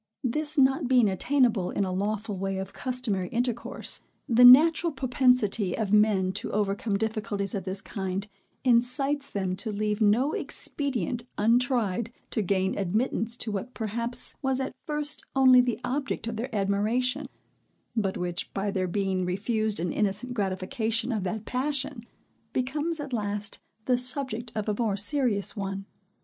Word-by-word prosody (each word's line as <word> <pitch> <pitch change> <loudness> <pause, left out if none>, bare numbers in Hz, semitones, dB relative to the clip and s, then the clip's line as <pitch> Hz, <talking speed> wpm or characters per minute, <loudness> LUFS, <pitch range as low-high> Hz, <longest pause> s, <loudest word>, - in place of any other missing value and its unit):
This 300 +5 -1
not 270 +1 +3
being 250 -3 +5
attainable 220 -1 +1
in 200 - -1
a 185 - -3
lawful 205 +2 -2
way 195 0 -2
of 190 0 -5
customary 240 -8 -1
intercourse, 240 +1 -1 0.3
the 240 +1 +5
natural 320 +7 +8
propensity 250 - +2
of 215 -2 -1
men 210 -3 +4
to 190 - -5
overcome 200 0 0
difficulties 215 -2 -2
of 195 -3 -3
this 190 +1 -2
kind, 190 0 -4 0.4
incites 265 +4 +1
them 190 -2 -2
to 220 - -3
leave 210 +1 -1
no 230 +8 +3
expedient 245 - -2
untried 230 -1 +1 0.2
to 220 - 0
gain 190 -1 0
admittance 220 +4 0
to 220 - -2
what 210 +5 -5
perhaps 235 +2 0
was 265 -2 +1
at 265 - -3
first 300 -1 0
only 260 -2 +7
the 245 -2 -1
object 265 -1 -2
of 230 - -3
their 235 +4 -4
admiration, 225 +8 0 0.7
but 200 -4 0
which, 175 -1 -3
by 200 +1 -1
their 185 -1 -1
being 190 0 -1
refused 210 +3 -1
an 170 0 -1
innocent 210 +4 -1
gratification 220 +4 -1
of 215 -4 -1
that 215 +3 -3
passion, 275 -1 -2 0.5
becomes 300 +6 -1
at 285 -3 -6
last 205 -2 -2 0.2
the 250 -1 +2
subject 250 -2 -2
of 215 -1 -2
a 210 - +1
more 210 -4 0
serious 210 -1 +2
one. 195 -1 -4
220 Hz, 150 wpm, -27 LUFS, 200-255 Hz, 0.7 s, natural